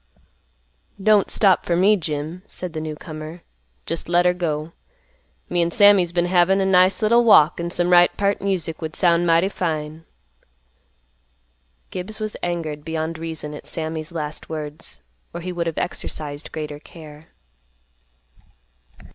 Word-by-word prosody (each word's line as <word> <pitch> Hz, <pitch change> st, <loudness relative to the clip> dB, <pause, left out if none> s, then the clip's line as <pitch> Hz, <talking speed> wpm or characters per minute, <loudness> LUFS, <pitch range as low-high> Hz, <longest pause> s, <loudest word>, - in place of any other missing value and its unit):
"Don't 210 Hz, 0 st, +3 dB
stop 195 Hz, -3 st, +4 dB
fer 170 Hz, -, 0 dB
me, 200 Hz, +4 st, +5 dB
Jim," 155 Hz, 0 st, -4 dB
said 180 Hz, -3 st, -6 dB
the 155 Hz, -, -4 dB
newcomer. 155 Hz, +1 st, -7 dB, 0.4 s
"Jest 165 Hz, 0 st, -4 dB
let 175 Hz, 0 st, +3 dB
her 180 Hz, -, +4 dB
go. 160 Hz, -3 st, -3 dB, 0.8 s
Me 175 Hz, 0 st, 0 dB
an' 170 Hz, -, +1 dB
Sammy's 195 Hz, -1 st, +5 dB
been 175 Hz, 0 st, +1 dB
havin' 180 Hz, +2 st, +3 dB
a 195 Hz, -, +1 dB
nice 185 Hz, +2 st, +4 dB
little 235 Hz, +3 st, +4 dB
walk, 175 Hz, -9 st, +6 dB
an' 170 Hz, 0 st, -2 dB
some 175 Hz, 0 st, 0 dB
right 175 Hz, 0 st, +7 dB
peart 200 Hz, 0 st, 0 dB
music 185 Hz, -5 st, -2 dB
would 160 Hz, -1 st, -5 dB
sound 175 Hz, -1 st, +3 dB
mighty 165 Hz, +2 st, +4 dB
fine." 160 Hz, -4 st, -4 dB, 1.9 s
Gibbs 190 Hz, +4 st, -6 dB
was 215 Hz, -1 st, -4 dB
angered 160 Hz, -4 st, -3 dB
beyond 160 Hz, 0 st, -3 dB
reason 160 Hz, -2 st, -6 dB
at 150 Hz, -, -10 dB
Sammy's 160 Hz, 0 st, -4 dB
last 155 Hz, -2 st, -5 dB
words, 155 Hz, -1 st, -5 dB, 0.3 s
or 170 Hz, -, -4 dB
he 180 Hz, +2 st, -4 dB
would 170 Hz, -1 st, -2 dB
have 165 Hz, -, -3 dB
exercised 150 Hz, -3 st, -5 dB
greater 150 Hz, -2 st, -6 dB
care. 155 Hz, -1 st, -13 dB
170 Hz, 145 wpm, -22 LUFS, 155-180 Hz, 1.9 s, right